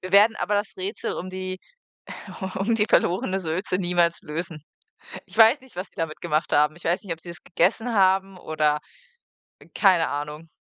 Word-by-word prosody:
wir 185 - -8
werden 210 +3 +7
aber 205 - -1
das 205 -1 -1
Rätsel 195 +3 -3
um 185 - -5
die 185 0 -5 0.8
u 190 - -3
um 225 +4 +1
die 210 0 +2
verlorene 190 +2 +2
Sülze 180 +2 -1
niemals 175 -1 +2
lösen. 160 0 -5 0.6
Ich - - -12
weiß 230 +5 +7
nicht, 260 - -18
was 185 - -4
sie - - -34
damit 160 -1 -4
gemacht 155 -2 -1
haben. 150 +2 +3
Ich 175 - -13
weiß 175 +5 +1
nicht, 185 -5 -4
ob 165 - -6
sie 170 - -9
es 170 - -8
gegessen 215 +7 +1
haben 190 -1 +2
oder 155 -2 0 1.0
keine 185 -5 +4
Ahnung. 150 +3 -5
185 Hz, 185 wpm, -24 LUFS, 165-195 Hz, 1.0 s, werden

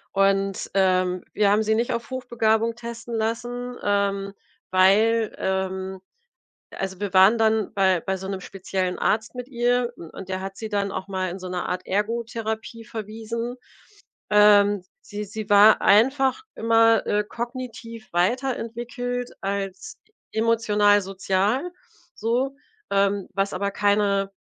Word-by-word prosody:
Und, 195 0 +1
ähm, 185 -1 +2
wir 205 -1 +3
haben 210 +2 +3
sie 220 0 +1
nicht 235 +3 0
auf 235 +2 -4
Hochbegabung 230 -3 0
testen 235 0 -8
lassen, 240 +2 -3
ähm, 200 -1 0 0.4
weil 215 +4 +4
ähm, 190 0 -2 0.7
also, 190 -1 -5
wir 205 -3 -3
waren 195 +5 +6
dann 220 -2 +2
bei 190 -3 +3
bei 190 +2 -2
so 190 0 -7
'nem 195 -1 -4
speziellen 185 -1 -3
Arzt 220 +3 0
mit 250 0 -5
ihr 245 -1 +1
u 165 - -10
und 190 -1 -9
der 185 0 -3
hat 195 0 -6
sie 220 - -6
dann 200 -1 -1
auch 190 - -5
mal 185 -2 -2
in 185 - -6
so 185 -1 -7
'ne 180 -1 -3
Art 180 - -3
Ergotherapie 225 +2 -3
verwiesen. 225 +3 -5 0.7
Ähm, 205 -1 +5 0.2
sie 210 +1 -6
sie 215 +1 -7
war 205 +2 +7
einfach 265 - +4
immer, 225 0 +4
äh, 210 0 +1
kognitiv 230 -2 -7
weiter 245 +9 +1
entwickelt 245 +1 -5
als 195 -1 -4 0.3
emotional-sozial 205 - +2 0.4
so, 250 +5 -1 0.3
ähm, 200 -1 +1
was 195 0 0
aber 200 +2 -1
keine 200 -1 +1
210 Hz, 135 wpm, -24 LUFS, 195-230 Hz, 0.7 s, war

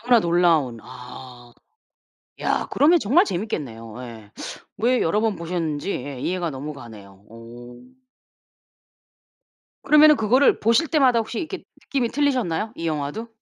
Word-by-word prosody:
너무나 240 0 +4
놀라운 170 - +2
아. 125 -1 -12 0.9
야 - - 0
그러면 330 +5 +4
정말 310 - +3
재밌겠네요. 130 - -5
예. 110 -4 -11 0.5
왜 240 +4 +1
여러 205 +6 +1
번 220 -4 0
보셨는지 165 -1 -3
예 130 0 -6
이해가 175 -2 -2
너무 145 +3 -6
가네요. 100 -6 -13
어. 120 +2 -12 2.1
그러면은 300 0 +6
그거를 250 +4 +3
보실 230 +8 +2
때마다 265 -7 +3
혹시 225 +1 -4
이렇게 365 +3 -6 0.2
느낌이 260 -4 -1
틀리셨나요? 245 - -1
이 165 - -4
영화도? 155 +9 -3
170 Hz, 295 characters per minute, -22 LUFS, -, 2.1 s, 그러면은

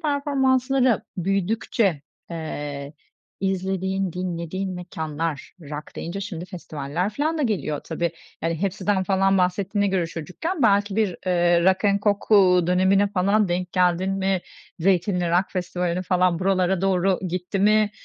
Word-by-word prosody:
performanslara 270 - +2
büyüdükçe, 195 -2 0 0.3
eee, 145 -3 -5 0.5
izlediğin, 190 -1 -1
dinlediğin 180 +1 -3
mekânlar 160 -4 -4
rock 150 0 -8
deyince 175 +4 -5
şimdi 175 -3 -5
festivaller 170 0 -4
filan 310 +8 -1
da 300 - 0
geliyor 190 - -1
tabii. 170 0 -2 0.3
Yani, 165 0 0
Hepsi'den 195 0 0
falan 195 0 +2
bahsettiğine 195 +3 +1
göre 185 -3 0
çocukken 185 - -4
belki 205 -2 +3
bir, 210 -5 +1
eee, 175 -1 +3
Rock'n 200 +2 +3
Coke, 205 +1 +2
uuu, 180 -3 +5
dönemine 190 +3 +3
falan 200 +1 +2
denk 180 0 -2
geldin 180 +1 +2
mi? 190 -1 0 0.4
Zeytinli 180 0 +1
Rock 180 +2 +3
Festivali'ne 180 -1 -2
falan 180 -2 +2
buralara 185 -1 +1
doğru 190 -1 +2
gitti 180 +3 -3
mi? 210 +1 +4
185 Hz, 130 wpm, -23 LUFS, 175-200 Hz, 0.5 s, uuu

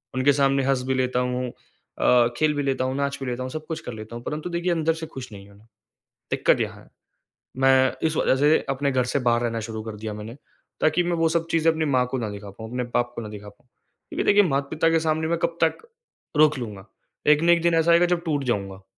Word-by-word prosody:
उनके 130 +2 +4
सामने 135 0 +2
हँस 135 -2 +1
भी 130 - +1
लेता 125 -1 0
हूँ 125 0 -1
अ, 120 0 0
खेल 155 -1 +2
भी 145 - -1
लेता 135 -2 0
हूँ, 130 +1 -2
नाच 140 0 -1
भी - - -3
लेता 125 +1 -3
हूँ, 130 - -5
सब 155 +2 -6
कुछ 160 - -4
कर 125 - -7
लेता 110 +1 -9
हूँ। 120 - -10
परन्तु 155 +3 -4
देखिए 175 +1 -1
अंदर 165 -1 +1
से 165 0 -6
खुश 130 -6 -9
नहीं 100 0 -11
हूँ। 100 - -18 0.7
दिक्कत - - +2
यहाँ - - -4
है। - - -22 0.7
मैं 130 0 +5 0.2
इस 155 - -4
वजह 130 - +2
से 150 +3 +4
अपने 140 +1 0
घर 130 -1 +2
से 140 - +3
बाहर 120 0 +2
रहना 115 -1 -1
शुरू 110 -1 -5
कर 110 -1 -6
दिया 105 0 -5
मैंने। 105 +3 -8 0.4
ताकि 155 +3 +3
मैं 175 0 0
वो 165 0 +2
सब 165 0 0
चीज़ें 165 0 +3
अपनी 160 0 -1
माँ 130 -4 +2
को 130 - -2
ना 110 -3 -3
दिखा 100 0 -8
पाऊँ, 110 +3 -10
अपने 125 0 -2
बाप 120 0 +1
को 115 - -4
ना 110 - -7
दिखा 105 -1 -9
पाऊँ। 105 +4 -19 0.4
क्योंकि - - -2
देखिए 205 0 +5
माता-पिता 155 0 0
के 165 0 +3
सामने 160 0 0
मैं 170 0 0
कब 170 0 -1
तक 160 - 0 0.6
रोक 155 -2 +5
लूँगा। 105 -5 -7 0.4
एक 150 +1 +5
ना 170 +1 +5
एक 170 -1 +3
दिन 170 -1 +3
ऐसा 165 +1 +4
आएगा 170 +1 +5
जब 175 -1 0
टूट 145 -4 -1
जाऊँगा। 100 -5 -3
135 Hz, 250 wpm, -24 LUFS, 120-160 Hz, 0.7 s, मैं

